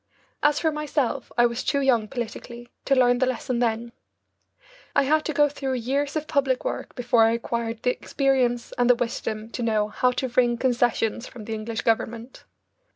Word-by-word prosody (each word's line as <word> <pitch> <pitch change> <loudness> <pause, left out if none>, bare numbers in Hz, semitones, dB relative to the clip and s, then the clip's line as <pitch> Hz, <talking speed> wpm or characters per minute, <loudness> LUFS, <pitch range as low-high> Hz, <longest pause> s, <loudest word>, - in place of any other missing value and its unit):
As 295 0 +3
for 320 - +1
myself, 300 -3 -2
I 240 - +6
was 235 +1 -1
too 280 - +1
young 245 -6 +2
politically 240 +1 -6 0.2
to 275 - +3
learn 245 -1 +4
the 260 - +2
lesson 255 -1 -2
then. 235 0 -1 1.0
I - - +5
had 305 +3 +2
to - - -1
go 295 0 +4
through 275 -2 -3
years 275 +5 -1
of 310 -1 -1
public 275 -4 0
work - - -4
before 240 -2 +3
I 225 - +3
acquired 230 -1 -3
the 250 - +3
experience 250 -3 0
and 245 0 +3
the 245 - +7
wisdom 225 -2 -4
to 245 - -5
know 215 -2 +1
how 250 +4 +2
to 260 +1 -2
wring 240 0 +2
concessions 240 -2 0
from 225 -4 -10
the 225 - -4
English 220 +1 -4
Government. 230 +2 -2
245 Hz, 185 wpm, -25 LUFS, 230-270 Hz, 1.0 s, the